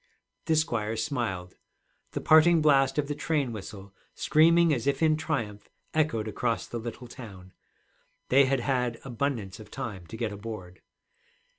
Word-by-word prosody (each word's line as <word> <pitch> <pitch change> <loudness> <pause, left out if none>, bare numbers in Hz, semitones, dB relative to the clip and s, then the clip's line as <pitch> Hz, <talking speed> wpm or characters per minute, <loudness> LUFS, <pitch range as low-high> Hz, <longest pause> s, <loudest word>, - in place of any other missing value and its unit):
The 160 - +2
squire 115 -8 0
smiled. 110 -8 -3 0.6
The - - -3
parting 160 +2 +6
blast 135 -3 +4
of 145 -1 +1
the 145 - -2
train 145 -4 -1
whistle, 100 -2 -9 0.2
screaming 165 +1 +4
as 120 -1 -2
if 140 +2 +1
in 155 -1 +4
triumph, 135 -10 -3 0.2
echoed 150 -9 +1
across 115 +2 -1
the 120 - -5
little 120 +2 -7
town. 95 -7 -11 0.8
They 135 +2 +6
had 135 -1 +1
had 125 -2 -1
abundance 120 -7 -3
of 105 -1 -12
time 95 -7 -6
to 110 - -8
get 115 -2 -2
aboard. 100 -3 -8
120 Hz, 150 wpm, -28 LUFS, 105-145 Hz, 0.8 s, parting